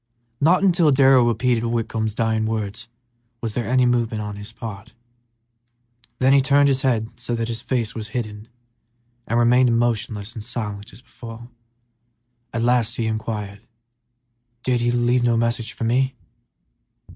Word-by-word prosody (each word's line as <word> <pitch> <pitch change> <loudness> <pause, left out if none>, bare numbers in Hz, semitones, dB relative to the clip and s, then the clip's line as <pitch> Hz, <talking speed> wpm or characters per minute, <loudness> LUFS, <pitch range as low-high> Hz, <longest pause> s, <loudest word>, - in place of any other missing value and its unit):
Not 175 +6 +4
until 175 -4 +4
Darrell 135 -2 +5
repeated 120 +1 +1
Whitcomb's 115 -2 -2
dying 110 -1 0
words 110 +1 -4 0.5
was 115 -3 -4
there 120 0 -3
any 130 0 +3
movement 115 -3 0
on 105 -1 -5
his 105 +2 -8
part; 110 -3 -9 1.2
then 130 +2 +4
he 140 - +6
turned 140 +1 +4
his 135 -1 +1
head 115 -4 0
so 120 0 -3
that 115 -1 -2
his 115 -1 -4
face 120 -4 -2
was 110 -1 -5
hidden 105 -2 -5 0.8
and 115 - 0
remained 120 0 +4
motionless 115 -2 -1
and 110 - -7
silent 105 -3 -5
as 115 +6 -15
before. 120 -1 -11 1.0
At 115 0 -2
last 120 -2 +2
he 115 - -1
inquired, 110 -2 -4 1.0
"Did 125 -2 +1
he 120 - +1
leave 120 +1 +2
no 120 -1 +2
message 115 0 -1
for - - -7
me?" 130 +3 +1
115 Hz, 150 wpm, -22 LUFS, 110-125 Hz, 1.2 s, he